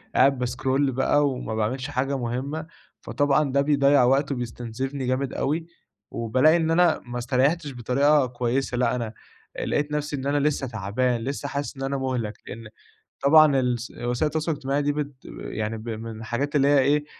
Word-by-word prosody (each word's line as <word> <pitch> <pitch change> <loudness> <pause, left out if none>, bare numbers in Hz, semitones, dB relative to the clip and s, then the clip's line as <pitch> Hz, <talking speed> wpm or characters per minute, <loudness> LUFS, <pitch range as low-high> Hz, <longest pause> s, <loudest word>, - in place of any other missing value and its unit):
قاعد 135 0 +5
باسكرول 130 +2 0
بقى 140 +3 +2
وما 125 -4 -4
باعملش 125 +5 -1
حاجة 135 0 -1
مهمّة، 130 +6 -3 0.4
فطبعًا 145 0 +1
ده 140 +1 +3
بيضيَّع 140 -2 +4
وقت 135 +3 +2
وبيستنزفني 125 +2 -4
جامد 130 +1 -1
أوي، 160 +4 -1 0.4
وبالاقي 130 +8 +3
إن 165 -1 0
أنا 170 -1 +4
ما 120 0 -6
استريَّحتش 140 +5 0
بطريقة 135 +4 +2
كويّسة، 125 +1 -2
لأ، 125 0 +1
أنا 115 -3 -4 0.4
آآ، - - -3
لقيت 150 0 -1
نفسي 150 0 -2
إن 135 - -5
أنا 145 +1 +1
لسّه 140 -2 -1
تعبان، 115 +2 -1
لسّه 140 +3 -4
حاسس 140 0 -4
إن 135 - -5
أنا 135 +1 -1
مُهلَك، 125 -5 -2
لأن 115 +1 -8 0.6
طبعًا 145 -1 +6
الس 125 -1 -1
وسائل 120 +4 -1
التواصل 155 +2 -1
الاجتماعي 145 -1 -1
دي 145 0 0
بت 145 -1 -3 0.3
يعني 110 +1 -4
ب 110 +2 -8
من 110 0 -6
الحاجات 125 +6 -3
اللي 140 -1 +4
هي 145 -1 +5
إيه، 145 +2 +2
135 Hz, 175 wpm, -25 LUFS, 120-145 Hz, 0.6 s, طبعًا